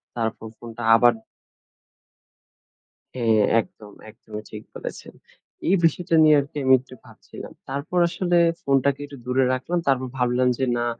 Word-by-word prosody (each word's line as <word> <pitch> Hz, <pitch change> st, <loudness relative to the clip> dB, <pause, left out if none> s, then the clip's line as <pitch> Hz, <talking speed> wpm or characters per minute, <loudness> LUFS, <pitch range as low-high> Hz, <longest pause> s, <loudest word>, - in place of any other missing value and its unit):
তারপর 110 Hz, -1 st, -3 dB
ফোনটা 120 Hz, 0 st, -9 dB
আবার" 120 Hz, +1 st, +5 dB, 2.0 s
হ্যাঁ, 115 Hz, -4 st, +2 dB, 0.2 s
একদম। 105 Hz, -1 st, -15 dB, 0.2 s
একদমই 105 Hz, 0 st, -10 dB
ঠিক 105 Hz, -, -8 dB
বলেছেন। -, -, -8 dB, 0.5 s
এই 190 Hz, -, +4 dB
বিষয়টা 165 Hz, 0 st, +1 dB
নিয়ে 155 Hz, -1 st, +6 dB
আরকি 140 Hz, +1 st, -6 dB
আমি 130 Hz, -, +5 dB
একটু 130 Hz, +1 st, -16 dB
ভাবছিলাম। -, -, -12 dB, 0.2 s
তারপর 140 Hz, +6 st, -2 dB
আসলে 175 Hz, 0 st, 0 dB, 0.2 s
ফোনটাকে 140 Hz, 0 st, +1 dB
একটু 140 Hz, -1 st, -12 dB
দূরে 130 Hz, +1 st, +1 dB
রাখলাম। 170 Hz, +7 st, -2 dB
তারপর 130 Hz, -1 st, +1 dB
ভাবলাম 125 Hz, +1 st, +1 dB
যে, 130 Hz, -, 0 dB
"না, 120 Hz, -, -1 dB
130 Hz, 135 wpm, -23 LUFS, 120-140 Hz, 2.0 s, নিয়ে